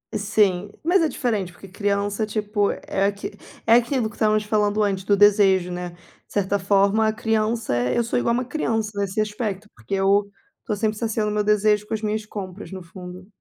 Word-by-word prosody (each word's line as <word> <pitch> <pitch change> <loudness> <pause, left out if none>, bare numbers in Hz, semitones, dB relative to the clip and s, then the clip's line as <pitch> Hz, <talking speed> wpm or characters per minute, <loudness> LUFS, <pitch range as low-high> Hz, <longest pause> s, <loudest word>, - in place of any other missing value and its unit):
Sim, 205 -2 +1
mas 355 +3 +3
é 325 - +3
diferente, 215 -9 -2
porque 195 +3 -13
criança, 205 +2 -1
tipo, 210 -1 0
é 195 0 -2
aqui 200 0 -4 0.3
é 225 - +5
aquilo 240 -1 +2
que - - -15
estávamos 215 -1 +2
falando 210 0 +1
antes 195 -2 -1
do 200 0 +3
desejo, 195 -3 +4
né, 180 0 -4
de 175 - -18 0.4
certa 200 0 0
forma 200 +3 +3
a 215 - +1
criança 225 - 0
é 125 - 0
eu 235 - +3
sou 230 +1 0
igual 235 - +1
a - - +1
uma 255 - -3
criança 225 -6 -1
nesse 200 +1 -2
aspecto, 210 -1 -2
porque 195 - -4
eu 200 +1 +2 0.3
estou 215 - -3
sempre 215 +1 -1
saciando 220 -2 -1
o - - -3
meu 210 0 +1
desejo 210 0 +2
com 220 - -2
as 215 - -5
minhas 215 0 -1
compras 195 -2 -7
no 190 -2 -7
fundo. 180 +1 -10
210 Hz, 205 wpm, -23 LUFS, 195-220 Hz, 0.4 s, é